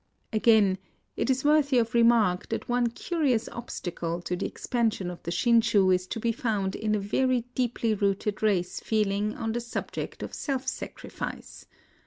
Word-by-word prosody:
Again, 215 -4 +4 0.4
it - - -1
is 265 +1 +1
worthy 295 -3 +4
of 230 -1 +1
remark 230 -6 +3
that 225 - -3
one 245 0 +2
curious 270 -3 0
obstacle 175 -7 -4
to 180 - -2
the - - -2
expansion 225 -7 -1
of 175 - -10
the - - -5
Shin 230 +7 +4
shu 205 -4 +3
is 185 0 +1
to 225 - -4
be 230 +1 +1
found 210 -5 -1
in 215 -1 0
a - - 0
very 250 +5 +1
deeply 240 -3 0
rooted 200 0 -1
race 190 -5 +1
feeling 210 -1 0
on 225 - -2
the 240 +2 -2
subject 235 - -5
of - - -6
self 265 -2 -3
sacrifice. - - -6
220 Hz, 170 wpm, -27 LUFS, 195-240 Hz, 0.4 s, Again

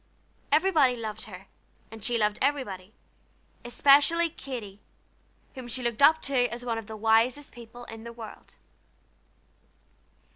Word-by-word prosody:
Everybody 300 -5 +4
loved 215 -2 -6
her, 190 -3 -11 0.5
and 220 -2 -11
she 240 -1 +1
loved 210 -1 0
everybody, 210 -8 -2 0.7
especially 290 +7 +4
Katy, 230 -10 -8 0.7
whom 255 -3 -8
she 245 +2 -3
looked 235 +1 -2
up 315 +3 +6
to 255 -3 +2
as 240 +1 -7
one 230 -2 -1
of 220 - -10
the 220 0 -7
wisest 225 +6 +2
people 240 0 -12
in 225 -1 -10
the 235 - -8
world. 230 -2 -11
240 Hz, 135 wpm, -27 LUFS, 220-275 Hz, 0.7 s, up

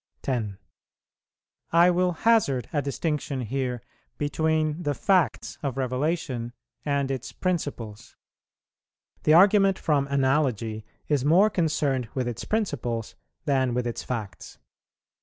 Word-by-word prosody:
10. 110 -7 -2 1.1
I 170 +2 +6
will 180 +1 +2
hazard 165 - +2
a 145 - +1
distinction 145 -1 -2
here 125 0 -3 0.3
between 155 +2 0
the 145 -4 -1
facts 175 - +1
of 135 -3 -3
revelation 130 -2 -2 0.3
and 140 -2 0
its 130 -2 -4
principles: 120 - -4 1.1
the 155 - +6
argument 195 +1 +6
from 145 -3 +1
Analogy 130 -6 0 0.2
is 145 -4 +1
more 180 +9 +5
concerned 150 - 0
with 130 -2 -1
its 120 -1 -5
principles 125 - -2 0.3
than 130 -3 +1
with 125 -1 0
its 120 - -3
facts. 110 -6 -6
140 Hz, 115 wpm, -26 LUFS, 125-160 Hz, 1.1 s, I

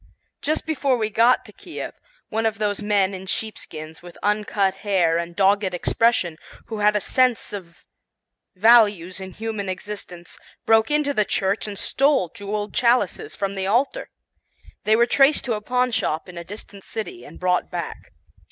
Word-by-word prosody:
Just 310 +2 -1
before 280 -5 +1
we 220 -2 -1
got 235 +4 +4
to - - -12
Kiev, - - -7 0.4
one 225 0 +1
of 220 -1 -2
those 205 -1 -1
men 200 -2 +2
in 190 0 -7
sheepskins 160 -7 -5
with 175 0 -12
uncut 205 -2 +1
hair 180 -5 +2
and 170 0 -5
dogged 195 -1 +2
expression, 180 -3 +1 0.3
who 220 -2 -6
had 210 0 +3
a - - +3
sense 250 +1 +1
of 175 -4 -9 0.7
values 205 -4 +4
in 190 -1 -8
human 215 -3 -4
existence, 185 -3 -7 0.3
broke 220 0 +4
into 295 -1 +1
the 215 - +3
church 200 +1 -1
and 205 -1 -6
stole 275 - +2
jeweled 205 +2 -4
chalices 250 - +1
from 195 -1 -2
the 190 -1 -2
altar. 265 - 0 0.8
They 215 - +5
were 235 +1 +5
traced 275 +4 +4
to 245 - 0
a 210 - -3
pawnshop 250 -9 0
in 180 - -11
a 170 - -6
distant 200 +1 -10
city 225 - -6
and - - -12
brought 180 0 +1
back. - - -6
210 Hz, 165 wpm, -23 LUFS, 190-230 Hz, 0.8 s, They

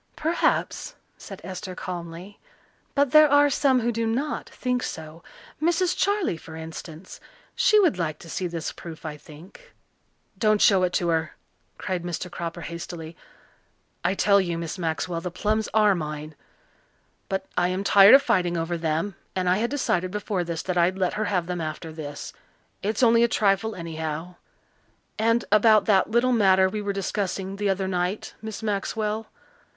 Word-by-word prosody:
"Perhaps," 340 +9 0 0.2
said - - -10
Esther 185 0 -6
calmly, 175 +2 -7 0.6
"but 280 -2 +2
there 305 -1 +7
are 290 0 +5
some 260 -1 +3
who 240 +1 0
do 230 0 -1
not 265 +7 -2
think 250 -1 -2
so. 160 -3 -7 0.4
Mrs. 345 +2 +2
Charley, 400 - 0
for 160 0 -11
instance 160 +2 -9 0.3
she 425 - +4
would 345 - +3
like 155 -3 -2
to 170 - -13
see 180 +2 -3
this 165 -2 -4
proof, 165 -1 -10
I 155 -1 -4
think." 170 - -15 0.6
"Don't 215 0 +3
show 195 -2 +5
it 180 -1 +1
to 175 - +1
her," 160 -1 -1 0.4
cried 185 -2 -3
Mr. 175 +1 -5
Cropper 170 0 -5
hastily. 170 -1 -7 0.9
"I 180 +3 +1
tell 200 0 +4
you, 170 -3 -2
Miss 170 +2 -5
Maxwell, 165 0 -2
the 180 - -4
plums 215 +4 -1
are 210 -2 +4
mine. 155 -2 -5 1.0
But 190 0 -2
I 180 - +2
am 185 +2 -2
tired 200 +3 +8
of 280 - +5
fighting 180 -8 +1
over 165 +1 -2
them 165 +5 -1 0.2
and 185 -1 -1
I 180 +1 +3
had 235 +3 0
decided 185 -10 0
before 205 -1 -2
this 170 -2 -4
that 180 -1 -1
I'd 180 +2 +2
let 185 -2 0
her 215 +1 -1
have 180 -4 0
them 180 -1 -3
after 155 +1 -5
this. 145 -2 -7 0.5
It's 215 +4 -1
only 230 0 +5
a - - +5
trifle, 210 0 +1
anyhow. 160 0 -5 0.9
And 230 +1 +2
about 215 0 +5
that 195 -2 +3
little 240 +3 +2
matter 190 -4 +5
we 210 +2 -3
were 205 -1 -2
discussing 195 0 -3
the 205 0 0
other 190 0 0
night, 180 +2 -2
Miss 220 0 -7
Maxwell. 215 +1 -2
190 Hz, 170 wpm, -25 LUFS, 170-220 Hz, 1.0 s, tired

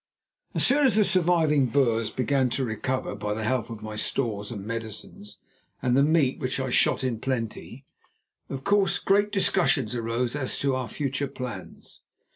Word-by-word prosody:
So - - +1
soon 280 +1 +5
as 245 - +2
the 215 - +5
surviving 165 -6 +3
Boers 115 -4 +1
began 130 0 +1
to 135 - 0
recover 125 +3 -2
by 105 0 -3
the 110 - -4
help 120 +1 -1
of 115 -2 -8
my 110 0 -6
stores 105 -4 -2
and 100 -4 -7
medicines 110 -2 -7 0.4
and 125 -1 +1
the 135 - +5
meat 145 -3 +2
which 130 +1 -2
I 130 -1 -2
shot - - +2
in 120 -4 -1
plenty, 125 +1 -4 0.6
of 135 -1 -5
course 200 -2 +2
great 205 +1 +2
discussions 175 - +2
arose 120 +2 -1
as 135 -3 -2
to 140 -1 0
our 130 -2 -3
future 140 +2 -2
plans. 125 -8 -8
130 Hz, 170 wpm, -26 LUFS, 115-145 Hz, 0.6 s, soon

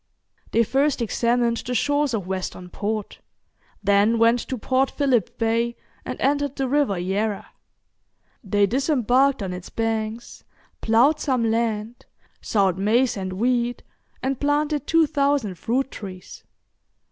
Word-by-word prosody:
They 230 - +3
first 270 +5 +1
examined 235 +1 +1
the 250 +2 -4
shores 290 -1 +1
of 200 -5 -3
Western 185 -1 -5
Port, 215 0 -4 0.6
then 205 +3 +3
went 230 +2 +4
to 260 - -4
Port 260 +4 +1
Philip 260 - 0
Bay 230 +1 0 0.3
and - - -6
entered 285 0 0
the 270 -1 -1
River 275 -7 +1
Yarra. 195 +3 -2 1.0
They 205 0 +2
disembarked 265 - +2
on 185 -2 -4
its 180 0 -8
banks, 225 0 -3 0.4
ploughed 250 +8 +3
some 250 -7 0
land, 225 0 -2 0.3
sowed 190 -4 +1
maize 230 +6 +2
and 190 -2 -4
wheat, 240 +3 0 0.4
and 265 -1 -1
planted 290 0 0
two 330 -1 +4
thousand 280 - 0
fruit 260 +4 -1
trees. 185 -3 -9
235 Hz, 130 wpm, -23 LUFS, 210-270 Hz, 1.0 s, went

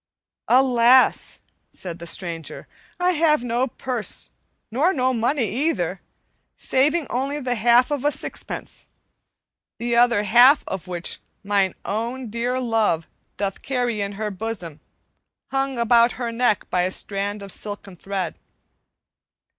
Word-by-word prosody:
"Alas!" 250 0 +4 0.3
said 175 -2 -7
the 170 - -7
stranger, 165 -2 -4 0.3
"I 360 +1 +3
have 305 -5 +3
no 245 +2 0
purse 250 -2 -4 0.4
nor 300 - +2
no 255 -2 +1
money 240 +1 +1
either, 295 +9 -1 0.5
saving 290 +5 +2
only 275 +4 -1
the 255 -3 -1
half 240 +3 +4
of 285 -3 -1
a 295 - +3
sixpence, - - -4 0.9
the 235 0 -1
other 235 -3 +4
half 245 +7 +6
of 190 -3 -5
which 175 -1 -3 0.2
mine 200 -2 +1
own 235 +3 -3
dear 245 +3 -1
love 220 -9 +1 0.3
doth 195 -1 -3
carry 245 -5 -1
in 200 0 -3
her 210 +1 -3
bosom, 190 -7 -5 0.7
hung 270 -1 -1
about 235 0 +4
her 240 -2 -3
neck 230 -3 +1
by 180 - +2
a 180 - +1
strand 200 +1 -3
of 200 - -8
silken 205 -2 -5
thread." 190 -2 -4
235 Hz, 130 wpm, -23 LUFS, 200-255 Hz, 0.9 s, half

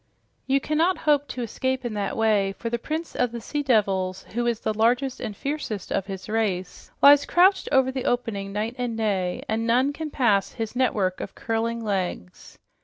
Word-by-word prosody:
"You 270 +1 +3
cannot 320 +6 +1
hope 290 -2 +2
to 245 - -4
escape 260 +3 -2
in 235 - -2
that 205 -2 -2
way, 210 -3 +2
for 230 +3 -5
the 235 - -1
prince 315 +6 -4
of 245 - +1
the 235 - -5
sea 295 +6 -3
devils, 195 -8 +1
who 240 +1 0
is 235 -2 0
the 220 - -1
largest 245 +5 +1
and 205 -2 -5
fiercest 275 -9 -4
of 195 -1 -1
his 190 -2 -7
race, 205 -5 -2
lies 285 0 +8
crouched 375 +2 +4
over 265 -2 +4
the 260 -1 -4
opening 215 -5 -1
night 215 +3 -2
and 240 -2 -2
day, 195 -5 -1
and 225 +1 -1
none 255 +5 +3
can 315 +1 -5
pass 220 -9 +1
his 225 +1 -5
network 205 -8 +1
of - - -7
curling 230 +1 -2
legs." 185 - -4
230 Hz, 190 wpm, -25 LUFS, 205-260 Hz, -, lies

